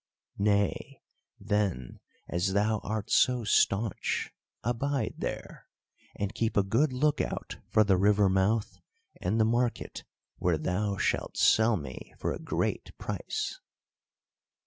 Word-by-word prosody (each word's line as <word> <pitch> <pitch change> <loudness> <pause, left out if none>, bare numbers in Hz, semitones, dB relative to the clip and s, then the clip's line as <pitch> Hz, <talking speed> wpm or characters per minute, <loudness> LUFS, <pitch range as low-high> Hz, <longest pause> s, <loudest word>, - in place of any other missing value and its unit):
Nay, 100 -1 0 0.4
then, 100 - -1 0.3
as 90 +3 0
thou 105 +2 +2
art 110 0 -4
so 125 -2 +4
staunch, 105 0 +1 0.3
abide 135 +4 -1
there - - -5 0.5
and 100 +1 -3
keep 115 0 -1
a 100 - +5
good 120 +9 +2
look 145 +3 +1
out - - -4
for 110 - +5
the 100 -3 +3
river 100 +1 +4
mouth 95 +4 +1 0.4
and 105 +5 0
the 110 - +5
market 120 +1 -1 0.3
where 90 -3 +1
thou 100 +5 -1
shalt - - -1
sell 110 0 +4
me 70 -6 -9
for - - -1
a - - -6
great - - -2
price." - - -4
105 Hz, 125 wpm, -29 LUFS, 95-115 Hz, 0.5 s, a